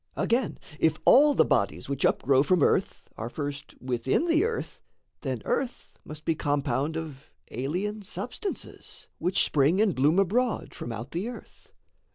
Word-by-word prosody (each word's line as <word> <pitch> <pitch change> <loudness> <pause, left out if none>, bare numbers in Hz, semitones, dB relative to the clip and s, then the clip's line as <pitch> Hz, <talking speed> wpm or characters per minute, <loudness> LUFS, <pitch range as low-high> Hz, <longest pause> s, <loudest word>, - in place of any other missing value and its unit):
Again, 235 -1 0 0.2
if 160 -1 +3
all 290 +2 +7
the - - +5
bodies - - 0
which 140 -1 -1
upgrow 135 -1 +3
From 170 +1 +3
earth, - - +1
are 115 +2 -4
first 145 +1 -6
within 130 - 0
the 330 0 +3
earth, 460 0 -4 0.4
then - - -4
earth 255 -2 -2
Must 150 0 -10
be 165 - +2
compound 145 0 -1
of 150 -4 -7 0.2
alien 180 - -2
substances. 390 - -7
Which 180 +2 +1
spring 150 +6 +2
and 210 -4 +3
bloom 150 +6 +3
abroad 220 +6 +1
from 120 - -6
out 115 +4 -6
the 185 +8 -3
earth. 245 - -12
160 Hz, 155 wpm, -27 LUFS, 140-215 Hz, 0.4 s, all